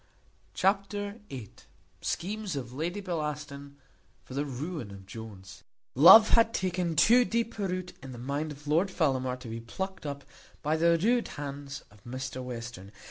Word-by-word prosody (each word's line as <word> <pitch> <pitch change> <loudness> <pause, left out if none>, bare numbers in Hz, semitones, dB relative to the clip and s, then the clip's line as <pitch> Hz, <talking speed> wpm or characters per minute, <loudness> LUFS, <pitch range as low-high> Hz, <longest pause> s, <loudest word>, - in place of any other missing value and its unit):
Chapter 200 +2 0
viii. 125 -7 -7 0.5
Schemes 205 -1 -2
of 125 -3 -5
Lady 170 +8 -2
Bellaston 150 -5 -4 0.5
for - - -11
the 140 +2 -1
ruin 145 - -5
of 100 -1 -11
Jones. 95 -2 -10 0.3
Love 190 - +10
had 230 -1 +4
taken 180 -3 0
too 235 +11 +6
deep 230 -1 -1
a 200 - 0
root 180 -1 -4
in 135 - -8
the 125 - -8
mind 140 +5 -2
of 145 0 -11
Lord 165 +6 +2
Fellamar 130 -8 0
to 125 - -8
be 115 +1 -5
plucked 190 +9 -5
up 140 0 -5 0.4
by 155 +1 +2
the 170 +1 +4
rude 235 +7 +2
hands 140 -1 -6
of 105 -1 -20
Mr 130 +1 -5
Western. 120 -6 -7
150 Hz, 160 wpm, -29 LUFS, 130-185 Hz, 0.5 s, Love